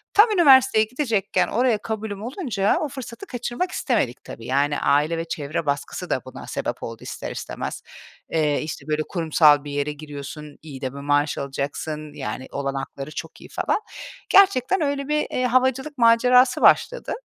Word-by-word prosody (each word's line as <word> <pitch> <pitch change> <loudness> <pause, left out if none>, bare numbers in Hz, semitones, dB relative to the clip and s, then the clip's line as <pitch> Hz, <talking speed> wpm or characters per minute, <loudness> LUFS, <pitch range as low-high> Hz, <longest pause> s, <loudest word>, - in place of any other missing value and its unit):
Tam 435 +2 +7
üniversiteye 265 - +6
gidecekken 230 -4 0
oraya 240 -1 +2
kabulüm 210 -2 -5
olunca 235 - 0
o 300 - -2
fırsatı 255 - -8
kaçırmak 250 +5 -3
istemedik 210 - -1
tabii. 115 - -10
Yani 140 +2 +1
aile 150 +4 +2
ve 165 - -3
çevre 155 +1 -3
baskısı 140 -1 -3
da - - 0
buna - - -10
sebep - - -4
oldu, - - -7
ister - - -6
istemez. - - -5 0.5
Eee, 150 -3 +1
işte 155 0 -6
böyle 155 0 0
kurumsal 155 -4 +4
bir 145 - -7
yere 145 +1 -1
giriyorsun, 150 0 -9
iyi 140 -4 -10
de 130 -1 -3
bir 140 - -8
maaş 145 +1 +1
alacaksın, 145 +2 -4
yani, 135 -2 -5
olanakları 140 +1 -4
çok - - -8
iyi - - -12
falan. - - -1 0.5
Gerçekten 380 -3 +4
öyle 280 -2 -1
bir, 300 0 +1
eee, 255 - 0
havacılık 260 +4 +1
macerası 250 +2 +5
başladı - - +3
195 Hz, 160 wpm, -23 LUFS, -, 0.5 s, Tam